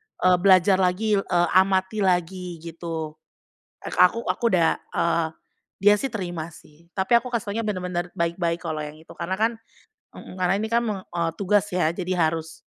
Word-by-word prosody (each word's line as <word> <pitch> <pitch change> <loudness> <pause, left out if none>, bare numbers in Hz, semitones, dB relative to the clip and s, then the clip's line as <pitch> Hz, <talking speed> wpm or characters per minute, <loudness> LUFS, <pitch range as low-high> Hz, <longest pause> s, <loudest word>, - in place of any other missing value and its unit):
eee, 180 0 +3
belajar 190 0 +5
lagi, 195 +4 +2
eee, 175 -3 +1
amati 190 +2 +3
lagi," 180 -1 -1
gitu. 165 -1 -6 0.7
Eee, - - -6
ke - - -6
aku 230 +6 +5
aku - - -3
udah 170 -5 +2 0.2
eee, 170 -1 +1 0.5
dia 205 0 +6
sih 270 - -2
terima 175 -9 -4
sih, 155 +3 -19
tapi 205 +5 +3
aku 245 - -10
kasih 230 -5 -3
tahunya 225 +2 -2
benar-benar 180 -3 -2
baik-baik 170 0 -1
kalau 160 -2 -3
yang 150 0 -6
itu, 160 +1 -18
karena 175 +2 -2
kan 225 +4 +1 0.6
mhm, 185 - -10
karena 180 - +3
ini 220 +1 -2
kan 235 +1 +3
me 215 -4 -2 0.2
eee, 170 -1 0
tugas 205 +1 +2
ya, 175 -3 +1
jadi 185 0 -3
harus 160 0 -1
180 Hz, 180 wpm, -24 LUFS, 170-200 Hz, 0.7 s, dia